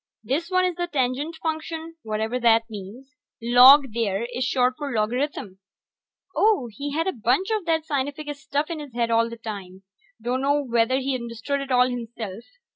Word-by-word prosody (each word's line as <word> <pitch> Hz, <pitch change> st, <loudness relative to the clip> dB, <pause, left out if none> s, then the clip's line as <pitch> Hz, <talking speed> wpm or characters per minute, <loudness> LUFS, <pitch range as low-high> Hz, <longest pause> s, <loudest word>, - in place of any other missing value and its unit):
This 295 Hz, -, -2 dB
one 370 Hz, -1 st, +3 dB
is 365 Hz, -, 0 dB
the 350 Hz, 0 st, -1 dB
Tangent 280 Hz, +1 st, -1 dB
Function, 320 Hz, +1 st, -4 dB
whatever 220 Hz, +3 st, -2 dB
that 230 Hz, -1 st, +4 dB
means. 225 Hz, +8 st, -10 dB, 0.2 s
Log, 250 Hz, +2 st, +7 dB
there, 220 Hz, -2 st, -1 dB
is 250 Hz, +2 st, -1 dB
short 255 Hz, 0 st, +2 dB
for 290 Hz, -1 st, -5 dB
logarithm. 220 Hz, -3 st, -2 dB, 0.8 s
Oh, 415 Hz, -, +3 dB
he 285 Hz, +7 st, -5 dB
had 325 Hz, +3 st, 0 dB
a 380 Hz, -, 0 dB
bunch 255 Hz, -, 0 dB
of 430 Hz, -5 st, -1 dB
that 320 Hz, -1 st, +1 dB
scientific 290 Hz, 0 st, -3 dB
stuff 285 Hz, +3 st, -3 dB
in 325 Hz, -, -4 dB
his 285 Hz, -5 st, -10 dB
head 235 Hz, -1 st, 0 dB
all 230 Hz, 0 st, +3 dB
the 235 Hz, -, -8 dB
time; 195 Hz, -4 st, -8 dB, 0.4 s
dunno 265 Hz, +5 st, 0 dB
whether 235 Hz, 0 st, +2 dB
he 270 Hz, 0 st, -1 dB
understood 235 Hz, +3 st, -3 dB
it 275 Hz, -, -6 dB
all 250 Hz, -1 st, +4 dB
himself. 230 Hz, -4 st, -6 dB
255 Hz, 175 wpm, -24 LUFS, 230-295 Hz, 0.8 s, Log